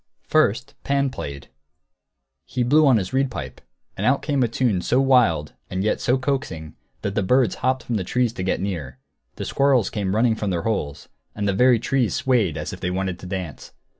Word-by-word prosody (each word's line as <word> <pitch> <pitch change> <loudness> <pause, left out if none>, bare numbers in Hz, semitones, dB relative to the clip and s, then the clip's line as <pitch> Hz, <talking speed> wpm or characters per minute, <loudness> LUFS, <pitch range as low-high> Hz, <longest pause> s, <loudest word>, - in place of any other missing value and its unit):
First 135 -2 +2
Pan 140 -1 +1
played; 70 - -7 1.0
he 125 - -1
blew 145 +5 +4
on 130 -4 +5
his 95 +3 -3
reed 135 0 +2
pipe, 70 - -7 0.3
and 95 - -4
out 130 +5 +2
came 140 -3 0
a 120 - +3
tune 115 -5 0
so 125 - +2
wild 120 - +3 0.2
and 95 +1 -2
yet 110 - 0
so 125 +2 +2
coaxing 125 - -3 0.3
that 100 - -2
the - - 0
birds 125 +2 +3
hopped 130 0 +1
from 115 - -2
the 95 - -2
trees 120 +5 0
to 95 - -6
get 95 - 0
near; 85 -9 -4 0.4
the - - -5
squirrels 135 -5 +2
came 100 -2 -2
running 115 +1 +3
from 105 -2 -3
their 85 -3 -1
holes; 75 -11 -3 0.3
and 105 -1 -2
the 100 - +2
very 125 +4 +5
trees 120 0 0
swayed 110 - +1
as 75 - -5
if - - -8
they 90 - -2
wanted 95 -1 -2
to 90 - -9
dance. 90 -6 -6
110 Hz, 205 wpm, -23 LUFS, 95-130 Hz, 1.0 s, on